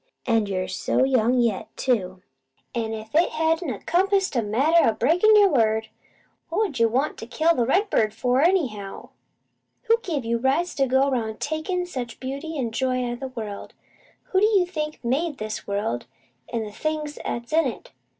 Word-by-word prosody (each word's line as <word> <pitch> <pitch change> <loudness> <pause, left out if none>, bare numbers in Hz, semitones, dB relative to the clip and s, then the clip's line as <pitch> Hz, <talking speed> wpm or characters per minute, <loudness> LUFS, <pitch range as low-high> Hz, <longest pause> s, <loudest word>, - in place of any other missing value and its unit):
An' 225 -3 +2
you 185 -2 -2
so 190 +6 0
young 255 -2 +3
yet, 230 -5 0
too! 190 -7 -1 0.5
"An' 225 -2 -2
if 220 0 -7
it 330 +3 +4
hadn't 320 +1 0
a 230 - -3
compassed 385 - +1
a 235 - +3
matter 275 +11 +3
o' - - 0
breakin' 345 - +4
your 410 -2 +6
word, 220 -5 +1 0.6
what 410 +5 +1
'ud 280 - -7
you 230 0 +4
want 265 +6 -1
to 225 - -7
kill 320 +6 +2
the 240 -6 0
redbird 315 - +2
for, 250 +4 +1
anyhow? 265 - 0 0.7
Who 460 +1 +3
give 310 - -3
you 235 0 0
rights 280 +8 +1
to 270 -1 +2
go 265 +2 +3
'round 220 -4 -2
takin' 315 +4 -2
such 255 -9 -6
beauty 280 +5 -5
an' 240 -4 -2
joy 255 +1 0
out 240 - -2
of 240 - -8
the 270 - -4
world? 220 -5 -7 0.6
Who 375 - +4
do 420 - +5
you 400 -5 +3
think 305 -6 -5
made 290 +5 0
this 215 0 -5
world 200 - -2 0.4
an' 230 -1 -1
the 210 - -7
things 305 +4 -3
'at's 235 +4 -4
in 325 +1 +4
it? - - -7
260 Hz, 190 wpm, -24 LUFS, 225-325 Hz, 0.7 s, your